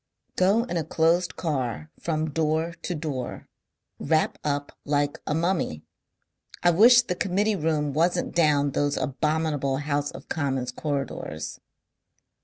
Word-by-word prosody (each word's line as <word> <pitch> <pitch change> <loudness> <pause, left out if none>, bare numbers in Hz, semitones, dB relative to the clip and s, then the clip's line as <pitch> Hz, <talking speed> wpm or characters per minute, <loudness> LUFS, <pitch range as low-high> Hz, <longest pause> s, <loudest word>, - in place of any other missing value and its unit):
"Go 200 +5 +3
in 235 -8 -3
a 165 - 0
closed 165 +3 +1
car 150 -2 -2
from 155 -2 -1
door 160 +2 0
to 180 - -3
door. 145 -5 -5 0.5
Wrap 160 -1 +1
up 145 -1 -1
like 145 0 0
a 150 - 0
mummy. 165 - -1 0.8
I 175 - +6
wish 235 +7 +7
the 180 - -2
Committee 200 +4 +1
room 150 -4 0
wasn't 170 +4 +1
down 150 -4 +3
those 145 +1 0
abominable 150 -1 0
House 145 0 -1
of - - -10
Commons 135 -5 -1
corridors...." 135 - -4
155 Hz, 130 wpm, -26 LUFS, 145-170 Hz, 0.8 s, wish